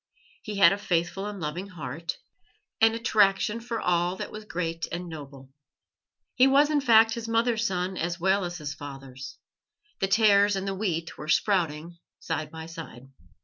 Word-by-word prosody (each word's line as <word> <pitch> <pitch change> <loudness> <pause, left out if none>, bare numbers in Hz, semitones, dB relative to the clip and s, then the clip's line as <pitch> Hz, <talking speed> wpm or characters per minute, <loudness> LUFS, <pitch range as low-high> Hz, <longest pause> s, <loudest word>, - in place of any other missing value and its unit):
He 210 - -6
had 180 -3 +7
a 200 - -4
faithful 185 0 -1
and 205 -1 -6
loving 170 +4 -4
heart, 165 -2 -6 0.6
an 225 0 +5
attraction 215 -2 +2
for 230 -1 -4
all 175 0 +1
that - - -6
was 215 0 -8
great 165 -4 -3
and 175 +1 -4
noble. 140 -4 -10 0.8
He 255 +1 +5
was, 285 +3 +4
in 295 -1 +2
fact, 225 -3 +5
his 230 -1 -5
mother's 230 0 +1
son 185 -1 -2
as 170 +2 -2
well 190 +2 +2
as 175 0 -4
his 150 -3 -5
father's; 135 -1 -9 0.6
the 195 - +1
tares 205 -1 +4
and 195 0 -3
the 195 - -1
wheat 175 -5 -3
were 150 - -7
sprouting 170 -2 0 0.2
side 155 -2 -3
by 160 0 -8
side. 160 -6 -10
180 Hz, 170 wpm, -27 LUFS, 165-215 Hz, 0.8 s, had